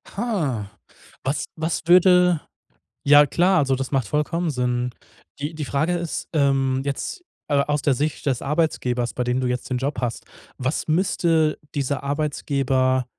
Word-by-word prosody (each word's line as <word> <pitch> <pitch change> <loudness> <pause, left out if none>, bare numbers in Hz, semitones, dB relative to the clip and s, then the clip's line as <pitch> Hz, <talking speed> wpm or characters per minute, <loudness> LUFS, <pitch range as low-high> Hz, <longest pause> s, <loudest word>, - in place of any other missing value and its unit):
Ha. 160 - -2 0.5
Was 140 +3 -1
was 160 0 -2
würde 180 -2 +5 0.6
ja 145 +1 +7
klar, 180 +5 +3
also 135 -3 +2
das 135 0 -4
macht 130 -6 0
vollkommen 165 +5 0
Sinn. 125 -2 -1 0.5
Die 145 +3 -4
die 155 -1 -4
Frage 140 +5 0
ist, 170 -2 -4
ähm, 135 -3 +2
jetzt, 140 - -4 0.3
äh, 145 -2 +2
aus 150 0 0
der 140 - +3
Sicht 150 +4 -2
des 130 -4 +1
Arbeitgebers, 130 -5 0
bei 125 - -1
dem 125 +1 0
du 130 - -1
jetzt 125 0 -2
den 125 - -1
Job 140 +2 -2
hast, 120 -2 -3 0.3
was 130 +5 -2
müsste 160 -2 +2 0.2
dieser 140 -1 -1
Arbeitgeber 135 -3 0
140 Hz, 155 wpm, -23 LUFS, 130-160 Hz, 0.6 s, ja